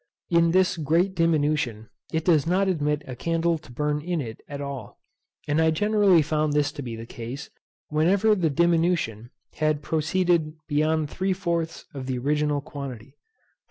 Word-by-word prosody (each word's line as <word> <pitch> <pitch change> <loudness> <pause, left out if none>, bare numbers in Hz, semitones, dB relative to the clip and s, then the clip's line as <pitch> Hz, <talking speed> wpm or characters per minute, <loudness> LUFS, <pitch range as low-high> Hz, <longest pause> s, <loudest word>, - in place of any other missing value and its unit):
In 170 0 +4
this 185 +2 +3
great 165 +5 +1
diminution, 150 - +1 0.2
it 160 -1 -1
does 165 -3 +3
not 190 +3 +2
admit 150 -4 0
a 130 - -7
candle 165 +4 0
to 135 - -15
burn 150 +3 -1
in 175 +1 -2
it 115 -6 -6
at 140 -1 -6
all; 140 -6 -6 0.5
and 150 +2 +2
I 160 - +4
generally 200 0 +4
found 150 0 0
this 145 -1 +2
to - - -7
be 120 -4 -5
the 115 0 -8
case 120 +4 -7 0.4
whenever 185 +8 +3
the 180 -6 +1
diminution 165 -8 +1 0.2
had 155 -1 0
proceeded 160 0 +1
beyond 155 0 +1
three 190 +1 0
fourths 170 -3 -2
of 135 -2 -6
the 130 -1 -1
original 150 +2 0
quantity. 135 -3 -8
155 Hz, 160 wpm, -25 LUFS, 145-170 Hz, 0.5 s, In